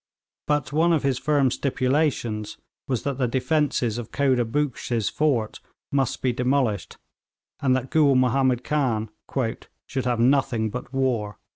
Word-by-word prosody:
But 145 -2 0
one 165 +3 +3
of 155 - +1
his 135 -2 +1
firm 145 -4 +2
stipulations 130 -6 -1 0.3
was 130 -4 -1
that 140 -2 -3
the 125 - +2
defences 130 -2 0
of 115 - -8
Khoda 130 -3 +2
Buxsh's 120 -3 -1
fort 135 -8 0 0.3
must 135 -3 0
be 125 -2 +2
demolished, 125 -5 0 0.6
and 130 -2 +2
that 130 0 -3
Gool 145 -4 +4
Mahomed 130 0 +2
Khan 120 -8 0 0.7
'should 130 -2 -3
have 120 -2 0
nothing 120 -3 +2
but 125 +1 -6
war.' 125 -6 -1
130 Hz, 140 wpm, -24 LUFS, 120-140 Hz, 0.7 s, Gool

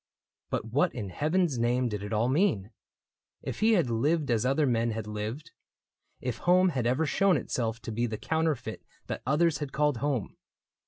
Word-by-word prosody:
But - - -2
what 140 +10 +1
in 105 -6 -4
heaven's 155 - 0
name 125 +2 +2
did 105 -3 -4
it 105 +1 -6
all 110 +2 +2
mean? 130 - +1 0.7
If - - -5
he 225 +1 +4
had 165 - +2
lived 145 +5 +1
as 115 +1 +2
other 135 +3 +2
men 115 -2 +1
had 110 -1 -4
lived. 110 +9 -5 0.7
If 125 -2 -4
home 180 +1 +4
had 130 -7 -1
ever 130 +6 +2
shown 190 +3 +3
itself 115 -3 -2
to - - -5
be 120 +2 0
The 110 -1 -4
counterfeit 160 -4 -1 0.2
that - - -5
others 150 +2 +2
had 145 -3 -4
called 150 -2 +1
home. 130 -4 -2
130 Hz, 180 wpm, -29 LUFS, 115-160 Hz, 0.7 s, he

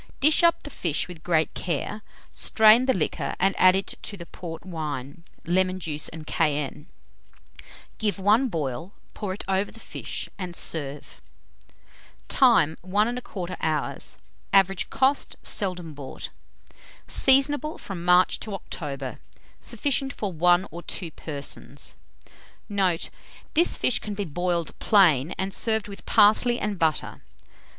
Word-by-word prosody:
Dish 305 +5 +5
up 340 0 +3
the 290 - -8
fish 165 - -1
with 175 -3 -10
great 160 -2 +1
care, 185 +5 -3 0.3
strain 220 +3 +5
the 260 - +4
liquor, 160 -5 -2
and 195 +2 +3
add 185 0 +7
to 205 - -6
it - - -13
the 170 - -8
port 170 -1 -9
wine, 155 -3 -5 0.2
lemon 185 +2 +1
juice, 155 -4 -1
and 160 -1 -9
cayenne; 150 -1 -1 1.1
give 210 -5 0
one 210 +7 +3
boil, 160 - -4 0.2
pour 205 -3 -4
it 190 - -5
over 195 +1 0
the 225 - -13
fish, - - -5
and 180 -2 -5
serve. 145 -4 -3 1.1
Time. 220 - +4
1 210 +6 +1
1/4 185 -7 -5
hour. 155 -2 0 0.6
Average 195 -1 +3
cost. 270 +2 +1
Seldom 180 -5 -2
bought. 140 -2 -7 0.8
Seasonable 290 +3 +4
from 185 -4 -7
March 180 +1 +4
to 210 -3 -5
October. 140 -7 -5 0.4
Sufficient 275 -1 -1
for 200 -4 -4
1 175 +3 +3
or 170 +2 -7
2 170 -1 -4
persons. 140 - -6 0.7
Note. 190 -5 0 0.4
This 340 +3 +3
fish 250 - +2
can 210 -1 -5
be 200 0 -3
boiled 175 +1 -2
plain, 170 - +4
and 190 +1 -2
served 220 0 0
with 200 -1 -11
parsley 240 +4 +5
and 210 -3 -3
butter. 160 -2 0
185 Hz, 135 wpm, -25 LUFS, 160-210 Hz, 1.1 s, add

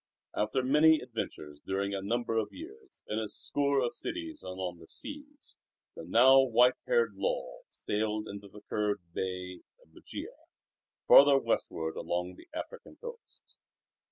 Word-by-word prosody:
After 110 +5 0
many 150 +4 +5
adventures 80 - -6
during 100 +1 -1
a 100 - -2
number 115 +3 -1
of 110 -2 0
years, 65 -8 -12
in 105 - -1
a 110 -2 -3
score 140 +5 0
of 120 - -1
cities 330 -3 -5
and 95 0 -7
on 90 -2 -4
the 80 - -14
seas, 295 0 -9 0.4
the - - -8
now 130 +9 +7
white 125 0 +5
haired 475 -2 +2
Lull - - -3
sailed 105 0 -2
into 100 0 -8
the 105 +1 -13
curved 105 -5 -2
bay 90 -1 -4 0.2
of - - -25
Bugia - - -8 0.7
farther 140 0 +9
westward 80 -10 -1
along 90 +1 -2
the - - -16
African 460 +10 -8
coast. 475 -1 -12
110 Hz, 150 wpm, -31 LUFS, 95-150 Hz, 0.7 s, farther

